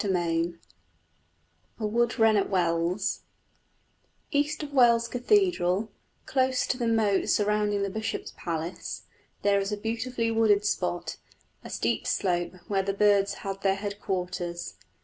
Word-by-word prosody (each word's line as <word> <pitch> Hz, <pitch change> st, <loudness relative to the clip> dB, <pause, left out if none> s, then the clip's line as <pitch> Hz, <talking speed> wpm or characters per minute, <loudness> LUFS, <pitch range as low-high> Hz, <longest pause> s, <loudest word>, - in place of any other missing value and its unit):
CHAPTER 195 Hz, -2 st, +1 dB
V 165 Hz, +1 st, 0 dB, 1.2 s
A 220 Hz, -, -2 dB
WOOD 235 Hz, +2 st, +1 dB
WREN 225 Hz, -1 st, +5 dB
AT 200 Hz, -, +1 dB
WELLS 175 Hz, 0 st, 0 dB, 1.1 s
East 295 Hz, +1 st, 0 dB
of 290 Hz, -1 st, -7 dB
Wells 235 Hz, -3 st, +5 dB
Cathedral, 245 Hz, -, +2 dB, 0.3 s
close 260 Hz, -1 st, +1 dB
to -, -, 0 dB
the 240 Hz, -2 st, -1 dB
moat 220 Hz, -4 st, +2 dB
surrounding 210 Hz, -1 st, +2 dB
the 200 Hz, -, -1 dB
bishop's 220 Hz, +2 st, -4 dB
palace, 165 Hz, 0 st, -4 dB, 0.4 s
there 200 Hz, 0 st, +4 dB
is 195 Hz, +1 st, -2 dB
a 210 Hz, -, -1 dB
beautifully 230 Hz, +2 st, -2 dB
wooded 215 Hz, -2 st, +3 dB
spot, 180 Hz, -3 st, -1 dB, 0.5 s
a -, -, -9 dB
steep -, -, -1 dB
slope, 175 Hz, -2 st, 0 dB
where 195 Hz, -2 st, +1 dB
the 195 Hz, +1 st, -2 dB
birds 200 Hz, 0 st, +3 dB
had 195 Hz, 0 st, -4 dB
their 195 Hz, -1 st, +2 dB
headquarters. 185 Hz, -4 st, -4 dB
205 Hz, 135 wpm, -27 LUFS, 190-230 Hz, 1.2 s, WREN